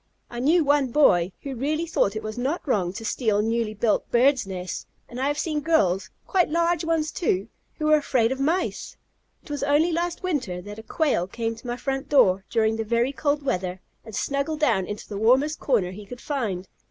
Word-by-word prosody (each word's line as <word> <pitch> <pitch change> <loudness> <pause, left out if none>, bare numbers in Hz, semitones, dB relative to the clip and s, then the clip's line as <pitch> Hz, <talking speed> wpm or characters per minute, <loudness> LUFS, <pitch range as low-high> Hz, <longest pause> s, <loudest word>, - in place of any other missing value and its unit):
I 240 - -5
knew 315 +7 +4
one 285 -1 +3
boy 190 - +4
who 275 - -4
really 305 +6 -1
thought 220 -10 +1
it 215 - -4
was 215 0 -5
not 275 +7 -2
wrong 190 -9 +1
to 225 +3 -7
steal 215 -2 +1
newly 225 -1 -1
built 215 +1 0
birds' 255 -1 +3
nests, 185 -2 -5 0.2
and 245 - -8
I 265 - +1
have 290 +1 0
seen 305 -1 -1
girls 195 - +2 0.2
quite 365 -3 +2
large 335 +1 +1
ones, 320 -2 0
too 205 - -1 0.3
who 305 - -4
were 305 0 +6
afraid 250 -5 +1
of 265 - -3
Mice! 325 +7 -1 0.5
It - - -11
was 290 - -3
only 295 +4 +3
last 345 +2 -2
winter 265 - -2
that 205 +4 -9
a - - -9
Quail 275 - 0
came 225 +3 -3
to 230 +2 -12
my 240 0 -3
front 270 +1 -3
door, 195 -9 +4
during 220 -1 +1
the 225 - -1
very 235 +4 +1
cold 290 +1 0
weather, 185 -8 -2 0.2
and 220 -2 -9
snuggled 280 +6 -1
down 210 -11 +2
into 210 0 -6
the 200 -2 -5
warmest 265 +8 +3
corner 215 -10 +1
he 205 +2 -10
could 245 +2 -9
find. 215 -12 -3
255 Hz, 210 wpm, -25 LUFS, 215-295 Hz, 0.5 s, were